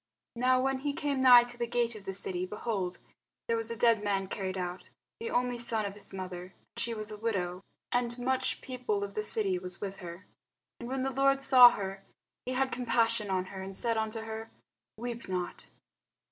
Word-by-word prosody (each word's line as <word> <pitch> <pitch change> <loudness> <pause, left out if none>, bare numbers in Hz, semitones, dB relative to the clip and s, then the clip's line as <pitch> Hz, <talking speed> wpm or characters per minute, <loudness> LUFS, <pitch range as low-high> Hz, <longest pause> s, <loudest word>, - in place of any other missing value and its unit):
Now 255 +2 +3
when 265 0 +1
he 285 +1 -2
came 285 -3 -1
nigh 250 -2 +9
to 240 0 -10
the 235 - 0
gate 235 0 0
of 210 -3 -11
the 195 - -3
city, 180 -2 0
behold, 195 -3 -3 0.5
there 230 - +2
was 225 0 -2
a 230 - -3
dead 230 -2 +3
man 195 -2 0
carried 190 -2 -3
out, 180 0 -5 0.3
the 460 +1 -4
only 245 - 0
son 230 -2 +1
of 200 - -4
his 205 0 -8
mother, 185 -2 -5 0.2
and - - -10
she 230 0 0
was 215 0 -4
a 210 - -7
widow: 185 -5 -2 0.3
and 245 -1 +1
much 260 +1 0
people 250 -6 -2
of 200 0 -5
the 215 - -1
city 205 -3 +1
was 180 -1 -1
with 195 -1 -5
her. 175 -1 -9 0.5
And 235 - -6
when 265 0 -1
the 270 - 0
Lord 275 +1 +3
saw 255 -2 +10
her, 195 -3 -5 0.4
he 255 - -1
had 265 +1 +1
compassion 230 -3 +1
on 185 -1 0
her, 190 - -6
and 190 0 -6
said 230 +3 0
unto 220 0 -2
her, 225 0 -6 0.5
Weep 235 0 -5
not. 180 -1 -4
225 Hz, 205 wpm, -31 LUFS, 195-245 Hz, 0.5 s, saw